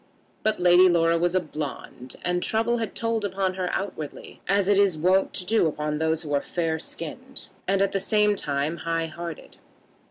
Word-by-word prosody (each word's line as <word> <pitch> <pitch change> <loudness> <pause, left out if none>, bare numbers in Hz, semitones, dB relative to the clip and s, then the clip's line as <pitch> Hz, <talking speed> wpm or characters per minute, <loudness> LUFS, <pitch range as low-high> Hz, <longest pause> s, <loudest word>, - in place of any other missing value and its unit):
But 215 0 0
Lady 180 +1 +6
Laura 165 -1 +3
was 175 +1 +1
a - - +5
blonde, 145 -5 -6
and 180 0 0
trouble 225 +4 +1
had 225 -3 -4
told 230 -1 -1
upon 190 -1 -1
her 185 -1 -2
outwardly, 160 -7 -5
as 195 0 +2
it 200 -1 +4
is 195 -5 +3
wont 185 +4 +3
to 180 - -2
do 215 -3 +3
upon 150 -1 -2
those 160 +1 0
who 145 -2 -4
are 140 - +2
fair 165 -2 -2
skinned, 250 - -8 0.2
and, 195 +1 +3
at 200 - 0
the 195 - 0
same 210 +1 +2
time, 145 -1 -2
high 165 0 -1
hearted. 165 0 -8
180 Hz, 190 wpm, -25 LUFS, 160-200 Hz, 0.2 s, Lady